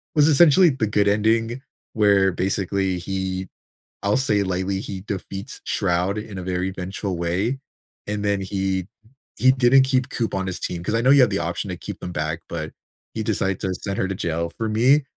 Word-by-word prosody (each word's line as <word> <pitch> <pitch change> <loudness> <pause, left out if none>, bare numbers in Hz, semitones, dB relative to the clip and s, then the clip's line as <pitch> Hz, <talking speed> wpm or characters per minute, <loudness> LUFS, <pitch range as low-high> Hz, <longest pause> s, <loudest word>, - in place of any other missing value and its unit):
was 150 -1 +5
essentially 165 +3 +6
the 120 -6 -1
good 100 0 +2
ending 115 +4 +1 0.3
where, 100 -3 +4
basically, 95 0 -1
he 95 0 -3 0.6
I'll 100 +1 +2
say 105 -6 +2
lightly, 95 +1 -1
he 95 -2 -6
defeats 100 +2 -6
Shroud 95 +1 0
in 105 -2 -6
a 95 - -5
very 90 +1 -1
vengeful 95 0 -4
way, 95 +10 -1 0.5
and 105 0 -2
then 100 -1 +1
he 95 -1 -2 0.5
he 130 - +5
didn't 130 +1 +5
keep 130 0 +1
Coop 115 -2 -2
on 95 0 -1
his 95 - -4
team, 85 -1 -4
'cause 105 - -2
I 115 - +2
know 130 - +3
you 140 -2 +7
have 125 - +5
the 100 - 0
option 85 +3 -3
to - - -3
keep - - -7
them 90 - -6
back, 80 +1 -2
but 80 -2 -4 0.4
he 110 - -2
decided 100 -3 -1
to 95 -1 -1
send 100 +2 -4
her 95 - 0
to 95 - -2
jail, 85 -1 -2
for 110 -1 -2
me, 130 +7 +4
100 Hz, 200 wpm, -23 LUFS, 95-115 Hz, 0.6 s, you